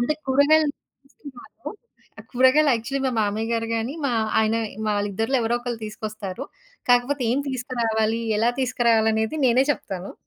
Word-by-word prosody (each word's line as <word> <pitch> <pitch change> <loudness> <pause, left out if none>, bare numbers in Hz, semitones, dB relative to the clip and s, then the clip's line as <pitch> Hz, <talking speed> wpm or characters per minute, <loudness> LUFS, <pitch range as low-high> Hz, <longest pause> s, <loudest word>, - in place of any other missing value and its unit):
అంటే 275 +6 +1
కూరగాయలు 290 +3 +4 0.3
తీసుకురాను. 275 -2 -12 0.6
కూరగాయలు 260 +4 +4
యాక్చువల్లి 265 +4 -3
మా - - +1
మామయ్య 215 +2 -1
గారు 230 0 -1
గాని, 230 +4 -2
మా 260 - +1 0.3
ఆయన 220 +1 +1 0.3
వాళ్ళిద్దరిలో 205 +4 0
ఎవరో 235 +2 +1
ఒకళ్ళు 240 -1 -5
తీసుకొస్తారు. 215 +1 -6 0.5
కాకపోతే 250 +3 +2
ఏం 250 - +1
తీసుకురావాలి, 230 -3 -1 0.2
ఎలా 230 +2 +3
తీసుకురావాలి 235 -3 +2
అనేది 220 +8 -1
నేనే 250 +2 +4
చెప్తాను. 190 -8 -7
235 Hz, 135 wpm, -23 LUFS, 220-265 Hz, 0.6 s, కూరగాయలు